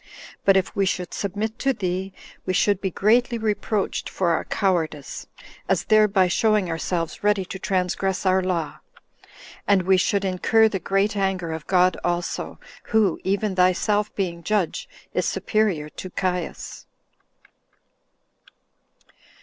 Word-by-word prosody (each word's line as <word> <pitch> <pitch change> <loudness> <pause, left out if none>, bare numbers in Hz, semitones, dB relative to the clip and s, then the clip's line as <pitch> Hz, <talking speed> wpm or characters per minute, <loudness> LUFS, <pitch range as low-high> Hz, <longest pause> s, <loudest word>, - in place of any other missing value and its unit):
But 195 -1 +6
if 190 - -1
we 195 -1 +2
should 180 -1 -2
submit 210 +3 -3
to 270 0 +1
thee, 190 -2 -3 0.3
we 185 - -2
should 200 +1 +2
be 190 - -1
greatly 235 +6 +2
reproached 215 -2 -1
for 175 -3 0
our 165 - 0
cowardice, 165 -7 -2 0.4
as - - +2
thereby 210 -3 +4
showing 210 -1 +2
ourselves 165 +1 -3
ready 205 -2 +2
to 190 - -7
transgress 190 0 -1
our 190 0 +3
law; 170 -5 -2 0.9
and 195 -2 +4
we 190 +1 +4
should 195 +2 +1
incur 220 +4 +3
the 200 -3 -2
great 195 +3 0
anger 190 -4 -1
of 160 -1 -6
God 180 -1 +3
also, 175 0 -2 0.3
who, 215 -6 +2
even 200 +1 0
thyself 195 +3 +2
being 175 -4 -2
judge, 200 -2 -1 0.2
is - - 0
superior 205 -9 0
to 185 - -8
Caius." 180 -2 -4
190 Hz, 135 wpm, -23 LUFS, 180-205 Hz, 0.9 s, But